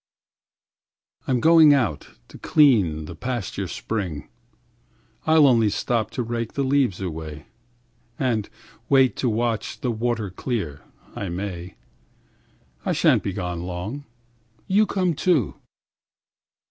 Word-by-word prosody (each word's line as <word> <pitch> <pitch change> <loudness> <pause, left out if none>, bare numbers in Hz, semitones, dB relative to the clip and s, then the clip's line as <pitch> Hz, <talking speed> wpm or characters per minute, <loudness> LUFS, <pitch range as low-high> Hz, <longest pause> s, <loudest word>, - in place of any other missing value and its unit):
1I'm 125 -2 +1
going 160 0 +7
out 100 - -1 0.2
to - - -13
clean 100 - +3
the 85 - -8
pasture 105 -3 -4 1.6
spring;2I'll 160 -1 +6
only 115 -5 +4
stop 110 +1 -1
to 120 +2 -3
rake 115 -1 -4
the 140 - -1
leaves 130 -7 +1
away3(And 115 - -6 0.4
wait 135 -2 +4
to 125 - 0
watch 115 0 -2
the 125 - 0
water 115 -3 -2
clear, 95 - -4 0.3
I 100 - -4
may):4I 85 -8 -8
sha'n't - - +4
be 100 - -3
gone 90 -3 -4
long. 90 +11 -5 0.6
You 205 +3 +3
come 185 -3 0
too. 155 - +1
115 Hz, 110 wpm, -23 LUFS, 90-130 Hz, 1.6 s, going